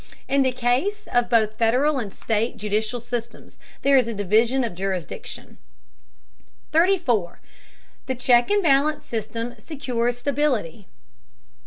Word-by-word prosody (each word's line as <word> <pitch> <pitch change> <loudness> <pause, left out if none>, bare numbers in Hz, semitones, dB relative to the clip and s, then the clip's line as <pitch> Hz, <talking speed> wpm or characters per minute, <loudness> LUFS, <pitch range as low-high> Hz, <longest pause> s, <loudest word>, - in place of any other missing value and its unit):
In 275 0 +2
the 260 -1 +2
case 255 +12 -1
of 245 -1 +2
both 220 -2 +2
Federal 260 +6 +2
and 210 -5 -5
state 225 +4 -2
judicial 215 +2 -2
systems 235 0 -7 0.2
there 280 0 +5
is 250 -3 +3
a 230 - -4
division 225 +6 +2
of 230 -6 -3
jurisdiction. 185 -3 -5 1.1
34. 310 - +2 0.7
THE 260 - -1
CHECK 245 -1 +3
AND 410 -1 +2
BALANCE 295 0 +2
SYSTEM 230 +1 -4
SECURES 245 -4 -2
STABILITY. 245 - -1
240 Hz, 125 wpm, -23 LUFS, 220-275 Hz, 1.1 s, there